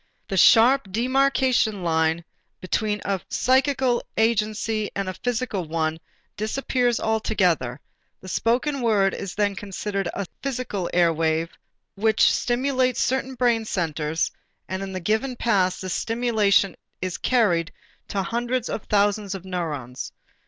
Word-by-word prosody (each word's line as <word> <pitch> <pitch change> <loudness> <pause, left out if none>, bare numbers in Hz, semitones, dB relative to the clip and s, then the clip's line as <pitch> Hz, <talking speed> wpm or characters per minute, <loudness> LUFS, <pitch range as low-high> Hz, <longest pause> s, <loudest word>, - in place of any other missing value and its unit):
The 195 - -2
sharp 225 +4 +5
demarcation 255 -3 +2
line 160 0 +1 0.3
between 210 +2 -1
a 195 -2 -1
psychical 260 -1 +2 0.2
agency 215 -1 +1
and 195 -1 -2
a 185 - -2
physical 230 -5 -2
one 160 0 -1 0.4
disappears 245 +2 0
altogether; 180 - 0 0.4
the 190 - -12
spoken 255 +8 0
word 205 -5 +3
is 195 -2 -5
then 205 -1 +1
considered 195 -1 -3
as 200 - -2 0.2
physical 245 -9 -3
airwaves 165 -1 +2 0.4
which 220 +2 +3
stimulate 255 0 +1
certain 265 0 0
brain 235 -2 +2
centers 160 -5 -1 0.4
and 190 +1 -4
in 195 0 -5
the 185 - -4
given 220 +8 0
paths 195 -7 +1
this 185 -1 -3
stimulation 220 -5 +2 0.2
is 185 -1 -3
carried 175 -11 +2 0.4
to 195 -1 -2
hundreds 240 +3 -2
of 215 - -4
thousands 205 -1 +1
of 190 -1 -8
neurons. 150 -9 -4
210 Hz, 125 wpm, -24 LUFS, 185-240 Hz, 0.4 s, sharp